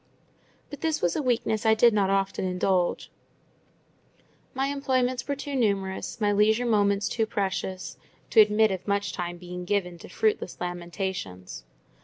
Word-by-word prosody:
But 290 - -8
this 320 -1 0
was 175 -1 0
a - - 0
weakness 235 -4 0
I 220 -1 +4
did 235 +1 +5
not 200 -2 +2
often 195 0 0
indulge: 180 -1 0 1.4
my 265 +1 0
employments 260 -3 0
were 285 - -1
too 280 0 -5
numerous, 200 -3 -1
my 205 -2 +2
leisure 215 +4 +3
moments 200 -3 +2
too 225 -2 -1
precious, 190 -2 -3 0.3
to 220 - +8
admit 210 0 +4
of 190 +1 -5
much 200 0 0
time 175 -1 -4
being 180 0 -7
given 180 -2 -1
to - - -12
fruitless 210 -2 -1
lamentations. 175 - -5
200 Hz, 150 wpm, -26 LUFS, 180-230 Hz, 1.4 s, to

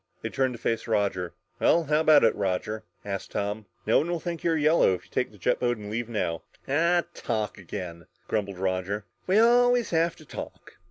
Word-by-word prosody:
They - - -2
turned 130 -1 0
to - - -11
face 115 0 -1
Roger. 100 -5 0 0.2
"Well, 170 - +4
how 150 0 +2
about 155 -2 +6
it, 110 - +5
Roger?" 100 +2 -2 0.2
asked 100 -1 -4
Tom. 105 +1 -2 0.2
"No 110 - +4
one 160 - -2
will 175 -1 -1
think 170 0 -5
you're 165 -1 +2
yellow 155 - +4
if 90 - -11
you - - -24
take - - -1
the - - -16
jet - - +1
boat 120 -1 +1
and 105 -1 -8
leave 120 +1 -3
now." 90 -7 -1 0.3
"Ah 170 +5 +3
talk 105 -2 -3
again!" 85 -2 -7 0.2
grumbled 100 -3 -2
Roger. 95 +2 -2 0.2
"We 190 +2 +3
always 245 +1 +4
have 165 0 +2
to 155 - -16
talk. - - -9
115 Hz, 205 wpm, -27 LUFS, 100-160 Hz, 0.3 s, about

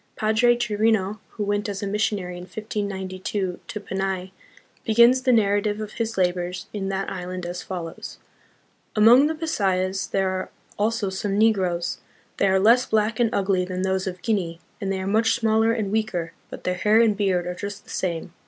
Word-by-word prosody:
Padre 225 +3 +3
Chirino, 215 -2 +1 0.2
who 210 - -1
went 205 +1 -1
as 200 0 -4
a - - -1
mis 205 +2 -2
sionary 190 -5 -1
in 175 0 -8
1592 190 -2 -4
to 210 - -5
Panay, 190 -2 -3 0.5
begins 235 +3 +5
the 260 -1 +2
narrative 205 -2 +2
of 215 -1 -5
his 230 -1 -3
labors 180 -1 -1
in 195 -2 -3
that 195 0 -2
island 180 -1 -5
as 175 +1 -4
follows: 170 -3 -7 0.4
" - - -40
Among 235 +7 +7
the 320 - -2
Bisayas, 195 - -1
there 190 -1 +1
are 185 0 -3 0.3
also 210 -2 0
some 195 +1 -2
Negroes. 190 -6 +1 0.4
They 200 - +3
are 190 0 +3
less 235 +5 +5
black 220 +1 +1
and 235 -2 +3
ugly 195 -4 +1
than 185 0 -3
those 190 0 0
of 180 -1 -6
Guinea, 180 -7 -1 0.2
and 195 -1 -1
they 190 - -1
are 190 - -4
much 220 +3 +2
smaller 225 -1 +2
and 215 -4 -1
weaker, 200 -6 -1 0.2
but - - -9
their 180 - 0
hair 210 +4 +3
and 225 -3 +4
beard 190 -3 +1
are 180 - -3
just 200 +2 -6
the - - -13
same. 170 -2 -3
200 Hz, 190 wpm, -24 LUFS, 185-220 Hz, 0.5 s, Among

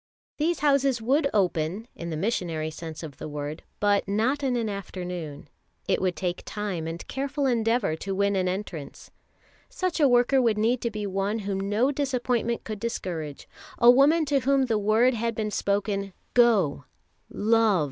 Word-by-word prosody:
These 325 0 0
houses 275 -3 +3
would 280 +6 +2
open, 185 +1 0
in 170 - -7
the 160 - -3
missionary 165 -5 -1
sense 160 0 -8
of 150 -4 -8
the - - -6
word, 150 +2 -5 0.2
but 205 -1 +2
not 225 +8 +1
in 265 -3 0
an 230 -2 0
afternoon. 180 -7 -6 0.4
It - - +1
would 185 -2 0
take 180 -2 -3
time 200 -6 -4
and 165 +1 -6
careful 280 +2 -2
endeavour 230 -7 +1
to 195 +3 -4
win 200 +1 +1
an 185 -1 +1
entrance. 180 -6 -5 0.6
Such 370 -9 -2
a 290 - +6
worker 245 +2 +4
would 230 -3 +2
need 230 +3 +1
to 235 - 0
be 210 -2 -4
one 195 +2 -1
whom 195 0 -2
no 235 +7 +2
disappointment 250 -4 -1
could 215 -2 -6
discourage, 170 -10 -4 0.3
a 240 0 +8
woman 295 +6 +4
to 280 -1 +2
whom 270 +1 +2
the 225 -4 0
word 220 +5 +3
had 230 0 -2
been 215 -1 -2
spoken, 200 -1 -1 0.2
"Go, 205 - +3 0.4
love 220 -2 +3
215 Hz, 170 wpm, -26 LUFS, 185-245 Hz, 0.6 s, a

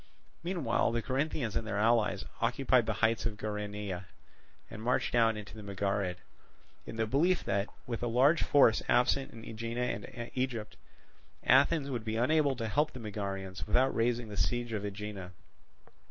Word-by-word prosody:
Meanwhile 170 -8 0
the 115 -1 -1
Corinthians 130 -3 -1
and 110 - -1
their 100 - -2
allies 115 +1 +2 0.2
occupied 130 -4 +2
the 110 - +1
heights 115 +1 +1
of 105 -2 -6
Geraneia, 105 -3 -4 0.6
and 105 - -9
marched 125 +3 0
down 115 -2 +4
into 105 +1 -9
the 110 - -8
Megarid, 100 -2 -1 0.7
in - - -6
the 110 0 0
belief 160 +11 +2
that, 100 +1 0 0.2
with 115 -2 -4
a 120 - 0
large 135 +8 +4
force 125 -6 +5
absent 130 +2 +3
in 115 -1 -11
Aegina 115 +1 -4
and 120 +1 -4
Egypt, 120 -5 -2 0.7
Athens 140 +2 +4
would 120 -4 -3
be 110 0 -3
unable 140 +4 +3
to 115 -2 -3
help 150 +8 +1
the 130 - -7
Megarians 100 -3 -5
without 130 +2 +3
raising 120 0 0
the 105 - -7
siege 120 +1 0
of 105 -2 -2
Aegina. 100 -2 -6
115 Hz, 165 wpm, -31 LUFS, 105-125 Hz, 0.7 s, force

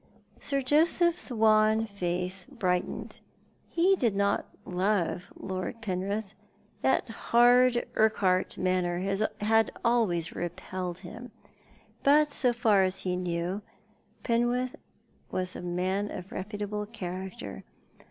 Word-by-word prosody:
Sir 275 -1 -1
Joseph's 330 +5 +3
wan 220 -1 +4
face 180 -2 -2
brightened. 180 -5 -2 0.5
He 365 +3 +3
did 235 - +1
not 200 0 +1 0.2
love 185 -1 -1
Lord 190 +4 -5
Penrith— 200 0 -3 0.5
that - - +2
hard 245 +1 +4
Urquhart 195 -4 +2
manner 180 -1 0 0.4
had 225 +1 +3
always 200 -9 +2
repelled 175 +1 -4
him; 220 +7 -9 0.7
but 295 +2 +5
so 255 -3 +2
far 225 -4 +3
as 185 0 +1
he 180 -1 -1
knew 180 +2 -2 0.6
Penrith 240 +2 +1 0.5
was 185 0 -2
a - - -6
man 185 +3 -1
of 185 +3 -8
reputable 210 0 -4
character. 185 - -6
205 Hz, 105 wpm, -29 LUFS, 185-235 Hz, 0.7 s, but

